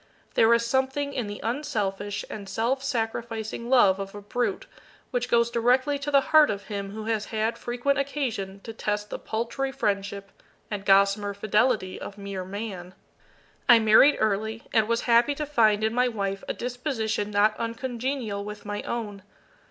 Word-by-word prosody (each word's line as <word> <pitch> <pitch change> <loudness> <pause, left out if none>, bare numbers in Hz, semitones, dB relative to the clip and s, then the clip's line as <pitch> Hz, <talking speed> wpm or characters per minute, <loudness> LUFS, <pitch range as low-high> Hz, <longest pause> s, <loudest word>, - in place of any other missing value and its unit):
There 225 0 +5
is 235 0 0
something 265 +3 0
in 240 -5 -2
the 205 0 -6
unselfish 210 -6 -2
and 200 -2 -8
self 255 +4 -1
sacrificing 230 -1 -3
love 200 -7 +5
of 195 0 -6
a 205 - -7
brute 225 -1 -2 0.5
which 245 -1 -1
goes 235 0 +3
directly 255 +5 +2
to 285 +1 -4
the 280 -1 +5
heart 310 -1 +8
of 200 0 -3
him 200 -1 -5
who 215 +2 -7
has 220 -2 -1
had 220 +1 -1
frequent 245 +4 -1
occasion 235 -9 -3
to 225 - -8
test 210 -1 -3
the - - -4
paltry 235 +5 -3
friendship 200 -3 -2 0.4
and 200 -1 -4
gossamer 200 +1 +4
fidelity 210 -1 +1
of 200 - -8
mere 200 -2 -5
Man. 190 -2 -6 0.7
I 240 - +10
married 220 +6 +6
early, 220 +2 -1
and 220 -2 +3
was 230 0 +1
happy 240 +4 +3
to 300 - -3
find 220 -7 +3
in 220 0 +1
my 250 +1 +3
wife 195 -4 -3
a - - -1
disposition 240 -4 -2
not 210 +1 +3
uncongenial 235 -2 -3
with 210 0 -8
my 205 0 -3
own. 210 -4 -4
220 Hz, 165 wpm, -26 LUFS, 205-245 Hz, 0.7 s, I